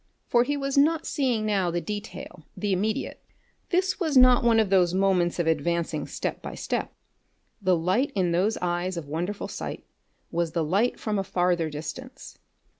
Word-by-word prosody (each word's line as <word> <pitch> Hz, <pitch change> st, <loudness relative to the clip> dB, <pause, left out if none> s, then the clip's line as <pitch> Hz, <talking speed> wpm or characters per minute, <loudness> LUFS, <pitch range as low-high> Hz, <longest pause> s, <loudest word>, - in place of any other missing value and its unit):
For 240 Hz, 0 st, +3 dB
he 290 Hz, +3 st, -1 dB
was 275 Hz, 0 st, +1 dB
not 315 Hz, +2 st, +3 dB
seeing 245 Hz, -6 st, 0 dB
now 195 Hz, -4 st, +1 dB
the 170 Hz, +1 st, -1 dB
detail, 205 Hz, -4 st, -7 dB
the 205 Hz, -2 st, 0 dB
immediate. 210 Hz, +4 st, -2 dB, 0.5 s
This 370 Hz, +1 st, +1 dB
was 315 Hz, -7 st, +1 dB
not 250 Hz, -1 st, +7 dB
one 230 Hz, -1 st, +4 dB
of 210 Hz, -3 st, +1 dB
those 180 Hz, -2 st, +4 dB
moments 185 Hz, -3 st, +2 dB
of 170 Hz, -, 0 dB
advancing 160 Hz, -1 st, 0 dB
step -, -, -4 dB
by -, -, -7 dB
step. -, -, -3 dB, 0.7 s
The 185 Hz, -2 st, +3 dB
light 185 Hz, +12 st, +1 dB
in 180 Hz, -3 st, +1 dB
those 190 Hz, +6 st, +1 dB
eyes 175 Hz, +1 st, -1 dB
of 160 Hz, -4 st, -5 dB
wonderful 175 Hz, +7 st, -3 dB
sight -, -, -6 dB, 0.5 s
was 170 Hz, -1 st, -1 dB
the 165 Hz, -, +1 dB
light 200 Hz, +10 st, +1 dB
from 210 Hz, -2 st, -1 dB
a -, -, 0 dB
farther 175 Hz, -3 st, +1 dB
distance. 155 Hz, -, -8 dB
190 Hz, 175 wpm, -26 LUFS, 170-240 Hz, 0.7 s, not